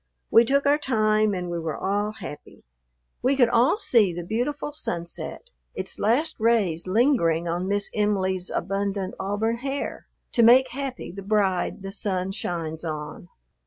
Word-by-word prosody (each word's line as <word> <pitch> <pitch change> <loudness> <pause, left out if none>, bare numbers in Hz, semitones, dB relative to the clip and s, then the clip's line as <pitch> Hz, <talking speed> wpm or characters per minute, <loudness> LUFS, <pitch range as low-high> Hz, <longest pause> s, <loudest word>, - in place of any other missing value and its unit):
We 230 +1 +7
took 280 +3 +2
our 290 +1 +4
time, 215 -5 +2
and 180 -1 -4
we 170 - -2
were 160 -2 -3
all 205 +2 -1
happy. 150 -8 -10 0.6
We 260 +3 +2
could 245 -3 +4
all 240 - +3
see 230 - +3
the 175 0 -5
beautiful 250 - -2
sunset, 175 - -5 0.2
its 185 0 -4
last 255 +10 +1
rays 210 -8 +1
lingering 185 - +2
on 175 +2 -2
Miss 205 0 -1
Em'ly's 190 -3 0
abundant 195 +1 -2
auburn 210 +4 -1
hair 270 +3 -4 0.2
to 235 - +2
make 250 +3 +7
happy 270 -1 -5
the 195 +2 -8
bride 195 -2 0
the 195 - -5
sun 190 -2 -2
shines 165 -4 -4
on. 155 +1 -6
205 Hz, 155 wpm, -25 LUFS, 180-235 Hz, 0.6 s, We